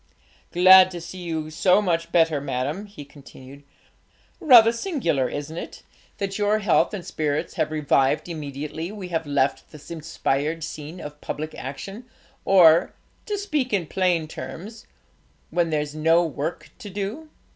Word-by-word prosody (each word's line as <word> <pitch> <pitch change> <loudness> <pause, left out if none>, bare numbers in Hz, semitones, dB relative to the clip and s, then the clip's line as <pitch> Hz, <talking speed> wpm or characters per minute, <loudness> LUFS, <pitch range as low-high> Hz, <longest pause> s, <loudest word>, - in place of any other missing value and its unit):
'Glad 185 +1 +8
to 175 -2 -7
see 185 +2 -9
you 160 -3 -4
so 180 +4 +3
much 170 -4 -1
better, 160 -4 +3
madam,' 140 +9 -3
he 200 -8 -11
continued. 140 -1 -14 0.8
'Rather 245 -9 +7
singular, 230 - -1
isn't 145 +3 -6
it, - - -8 0.3
that 195 +1 -3
your 205 +1 +2
health 210 -1 +2
and 190 -5 -6
spirits 150 -1 -2
have 155 - -1
revived 150 -1 +1
immediately 150 +1 -6
we 200 -4 -8
have 165 -3 -2
left 140 -1 0
the 150 +2 -10
inspired 155 0 -2
scene 155 +2 -7
of 150 -2 -9
public 155 +1 -5
action, 195 - -8 0.4
or 170 -4 +5 0.3
to 415 -1 -2
speak 305 -11 -2
in 195 -5 0
plain 175 -2 0
terms 210 +7 -9 0.6
when 170 -1 +1
there's 150 -1 -2
no 165 +3 +3
work 155 +1 -5
to 205 - -8
do!' 205 +11 -5
165 Hz, 145 wpm, -24 LUFS, 150-195 Hz, 0.8 s, Glad